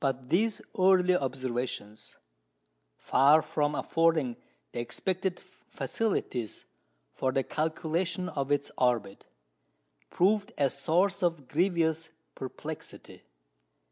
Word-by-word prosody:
But 135 -2 -2
these 215 +5 +1 0.2
early 185 -1 +5
observations, 125 -6 -3 0.8
far 150 +4 +5
from 150 -1 0
affording 160 -8 +2 0.4
the - - -4
expected 185 +9 -2 0.3
facilities 130 - -2 0.5
for 130 - 0
the 135 +1 +1
calculation 165 +4 -1
of 140 -5 -3
its 145 0 +1
orbit, 120 -6 0 0.8
proved 205 +4 +2
a 140 -2 +2
source 175 +8 +1
of 165 -7 0
grievous 165 -1 +1 0.2
perplexity. 130 - -8
155 Hz, 95 wpm, -29 LUFS, 130-180 Hz, 0.8 s, early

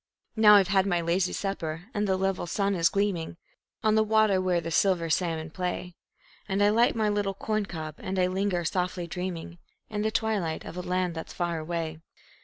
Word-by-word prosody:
Now 215 -2 +8
I've 195 -2 +5
had 195 0 +3
my 175 -3 +1
lazy 175 +2 +1
supper, 165 -5 -3
and 210 -1 0
the 190 -1 +2
level 190 -2 -1
sun 200 +2 0
is 170 -3 +3
gleaming 195 -5 -1 0.5
On 215 -1 +3
the 220 - +4
water 215 -3 +3
where 180 -2 +1
the 165 0 -5
silver 170 -2 +2
salmon 160 -2 -1
play; 180 0 -3 0.6
And 195 +1 +2
I 205 - +5
light 230 +3 +3
my 220 -1 +1
little 205 -2 0
corn 215 0 -1
cob, 155 -4 -6
and 190 0 -4
I 185 - +3
linger, 185 -1 -1
softly 180 0 -1
dreaming, 175 -1 -5 0.3
In 210 -1 -2
the 215 - +1
twilight, 210 -8 -1
of - - -8
a 180 - -3
land 180 -1 -1
that's 160 0 -7
far 170 -2 -2
away. 160 0 -4
185 Hz, 200 wpm, -27 LUFS, 170-205 Hz, 0.6 s, Now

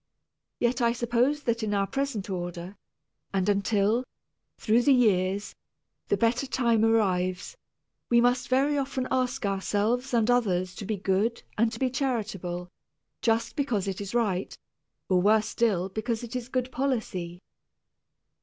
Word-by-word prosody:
Yet 245 +1 +1
I 235 0 +3
suppose 245 +5 +1
that 235 0 0
in 210 -2 -1
our 200 0 +2
present 270 -4 -3
order, 175 0 -5 0.6
and 190 0 +1
until, 205 +3 +2 0.5
through 225 +2 +3
the 275 +2 +5
years, 200 -4 +1 0.5
the - - +1
better 240 +4 +1
time 235 -4 +2
arrives, 185 - +1 0.5
we 235 - +5
must 245 +1 +2
very 280 +3 +2
often 265 -1 -2
ask 255 -3 0
ourselves 205 +6 0
and 235 -1 +3
others 185 -7 +1
to 205 - -6
be 215 -1 -1
good 200 +5 0
and 225 +1 +2
to 225 - -6
be 255 +1 0
charitable, 200 -10 -2 0.5
just 230 0 +1
because 230 -9 -1
it 195 0 -3
is 200 +3 -5
right, 200 -6 0 0.5
or 185 -1 +3
worse 215 +2 +3
still 205 -7 +1
because 220 +3 -3
it 240 +1 -7
is 250 0 -4
good 255 -1 -2
policy. 215 -11 -2
225 Hz, 145 wpm, -27 LUFS, 195-245 Hz, 0.6 s, the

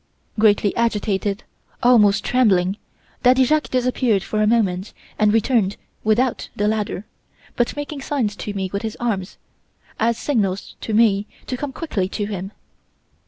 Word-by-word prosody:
"Greatly 205 -2 +3
agitated, 210 -3 0 0.4
almost 215 -5 +5
trembling, 195 -6 +2 0.4
Daddy 255 +1 +5
Jacques 305 +4 +1
disappeared 250 -5 +1
for 215 - -1
a 210 - +3
moment 200 -4 +1 0.3
and 210 -1 +4
returned 220 -2 +2 0.3
without 230 +4 +1
the 205 - 0
ladder, 210 -2 -2 0.5
but 240 - 0
making 290 0 -5
signs 250 -8 -1
to 210 - -4
me 190 -1 -1
with 200 - -1
his 220 -2 -5
arms, 205 -6 -2 0.6
as 230 +1 +2
signals 205 -9 -1
to 220 - -2
me 210 -2 +3 0.2
to 255 - -3
come 280 +2 -4
quickly 215 - -2
to 205 +1 -3
him. 195 -2 -5
215 Hz, 145 wpm, -21 LUFS, 200-245 Hz, 0.6 s, almost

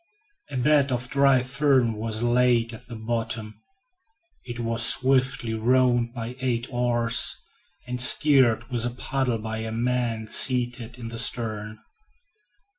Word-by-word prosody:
A 135 - -6
bed 140 +1 +2
of 125 0 -4
dry 140 -2 +3
fern 130 -3 +1
was 110 +1 -2
laid 120 -1 +1
at 120 +2 -13
the 120 - -9
bottom. 110 -1 -5 0.8
It 120 -1 -8
was 115 0 +2
swiftly 130 -2 +3
rowed 120 +1 +1
by 120 0 -7
eight 120 -2 -2
oars, 120 -2 +2 0.5
and 125 0 -4
steered 130 -4 +4
with 120 -2 -1
a 120 - -1
paddle 125 0 -3
by 110 0 -6
a 110 0 -6
man 115 -1 -2
seated 120 0 0
in 115 -2 -8
the 115 0 -6
stern. 110 -3 -2
120 Hz, 135 wpm, -24 LUFS, 115-125 Hz, 0.8 s, steered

